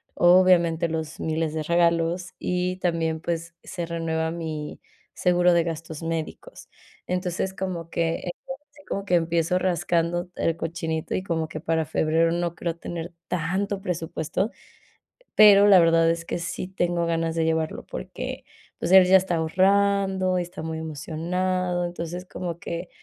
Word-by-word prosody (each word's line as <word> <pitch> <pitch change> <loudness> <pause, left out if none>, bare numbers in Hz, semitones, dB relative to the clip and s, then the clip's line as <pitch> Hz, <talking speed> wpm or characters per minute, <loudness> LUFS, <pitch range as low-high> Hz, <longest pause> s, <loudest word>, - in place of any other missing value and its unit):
obviamente, 175 -2 +4
los 160 0 -4
miles 160 -1 -1
de 155 - -2
regalos, 170 +1 +1
y 180 0 -1
también, 165 -3 -1
pues 170 0 -4
se 175 -2 -5
renueva 160 -1 -2
mi 160 -3 -5 0.3
seguro 180 -1 +3
de 170 - +4
gastos 165 -1 -6
médicos. 165 - -5 0.4
Entonces, 180 +1 -2
como 180 -3 -4
que, 165 +1 -1 0.2
ahora 270 +2 -6
sí 290 0 -18
como 195 - -3
que 180 - +2
empiezo 170 +1 +1
rascando 175 -1 0
el 165 0 0
cochinito 165 -1 -3
y 185 - -2
como 165 -4 -1
que 155 - -6
para 160 -1 0
febrero 160 +2 +2
no 170 0 -1
creo 170 -1 -3
tener 170 0 -6
tanto 190 +4 -1
presupuesto, 180 +3 -2 0.8
pero 205 -1 +8
la 195 -3 +8
verdad 165 -1 +4
es 165 0 -1
que - - -3
sí 170 +2 -4
tengo 175 -2 -1
ganas 165 -1 -1
de 165 -1 +1
llevarlo, 160 -1 -1
porque, - - -6 0.3
pues, 170 - -2
él 190 -1 +9
ya 190 +1 +7
está 185 -2 -1
ahorrando 190 +2 +2
y - - 0
está 175 - -9
muy 160 0 -4
emocionado, 175 +4 -2
entonces, 175 +1 -5
como 175 -2 -5
que, 170 +1 -5
170 Hz, 155 wpm, -25 LUFS, 165-180 Hz, 0.8 s, él